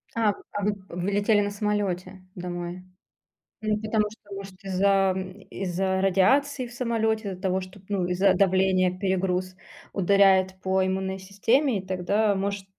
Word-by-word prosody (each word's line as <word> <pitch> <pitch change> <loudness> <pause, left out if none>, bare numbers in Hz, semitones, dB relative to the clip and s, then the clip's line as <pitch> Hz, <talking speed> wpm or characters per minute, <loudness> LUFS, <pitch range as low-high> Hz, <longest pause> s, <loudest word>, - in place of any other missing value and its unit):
А 220 -3 +2
в - - -16
а 205 - -3
вы 205 +1 +1
вы 180 +3 -3
летели 205 +1 +3
на 205 0 -1
самолёте 200 -3 -2
домой. 175 0 -5 0.8
Ну, 215 -1 0
потому 215 -1 +1
что, 210 -1 -14
может, 195 0 -10
из-за, 195 0 +2
м, 190 +1 -6
из-за 190 0 -1
радиации 255 +8 +2
в 240 - -13
самолёте, 225 -3 0
из-за 185 -1 -8
того, 190 -1 +1
что, 185 +1 -10
п 190 - -23
ну, 195 -3 0
из-за 185 +2 +3
давления 185 -1 +2
перегруз 185 -1 -1 0.4
ударяет 190 -1 +4
по 190 0 +1
иммунной 190 0 -2
системе, 225 +6 +1
и 190 - -9
тогда 200 +3 +1
может 200 0 -2
195 Hz, 160 wpm, -26 LUFS, 185-205 Hz, 0.8 s, ударяет